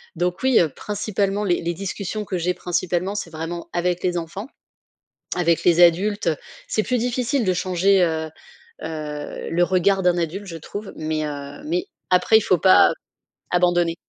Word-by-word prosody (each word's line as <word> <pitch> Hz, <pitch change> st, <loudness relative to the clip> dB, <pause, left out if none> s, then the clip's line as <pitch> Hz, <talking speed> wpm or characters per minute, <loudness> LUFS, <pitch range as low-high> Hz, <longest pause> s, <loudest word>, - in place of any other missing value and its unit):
Donc 175 Hz, +1 st, -1 dB
oui, 260 Hz, -2 st, +5 dB
heu, 170 Hz, -, +3 dB
principalement 205 Hz, +3 st, -2 dB
les 180 Hz, -4 st, +1 dB
les 170 Hz, +1 st, -2 dB
discussions 200 Hz, +3 st, -4 dB
que 190 Hz, -, -3 dB
j'ai 180 Hz, +2 st, 0 dB
principalement, 180 Hz, +2 st, -1 dB
c'est 205 Hz, -5 st, -4 dB
vraiment 165 Hz, +2 st, -6 dB
avec 175 Hz, 0 st, 0 dB
les 180 Hz, -1 st, 0 dB
enfants. 170 Hz, +6 st, -5 dB, 0.9 s
Avec 170 Hz, -2 st, +1 dB
les 175 Hz, 0 st, +5 dB
adultes, 190 Hz, +3 st, +3 dB, 0.4 s
c'est 215 Hz, -, +1 dB
plus 250 Hz, +3 st, 0 dB
difficile 245 Hz, +2 st, 0 dB
de 185 Hz, -, +2 dB
changer, 185 Hz, +2 st, +2 dB
heu, 160 Hz, -2 st, -1 dB, 0.5 s
heu, 150 Hz, -2 st, -5 dB
le 175 Hz, +1 st, +2 dB
regard 190 Hz, +2 st, +2 dB
d'un 180 Hz, -1 st, +3 dB
adulte, 175 Hz, +4 st, -3 dB
je 170 Hz, -, -7 dB
trouve, 205 Hz, +6 st, -8 dB
mais, 155 Hz, 0 st, -2 dB
heu, 145 Hz, -, -7 dB
mais 355 Hz, +5 st, -1 dB, 0.2 s
après 185 Hz, +4 st, +5 dB
il -, -, +2 dB
faut 185 Hz, -, +3 dB
pas 190 Hz, +2 st, +6 dB, 0.6 s
abandonner. 175 Hz, -1 st, +2 dB
180 Hz, 165 wpm, -22 LUFS, 170-200 Hz, 0.9 s, pas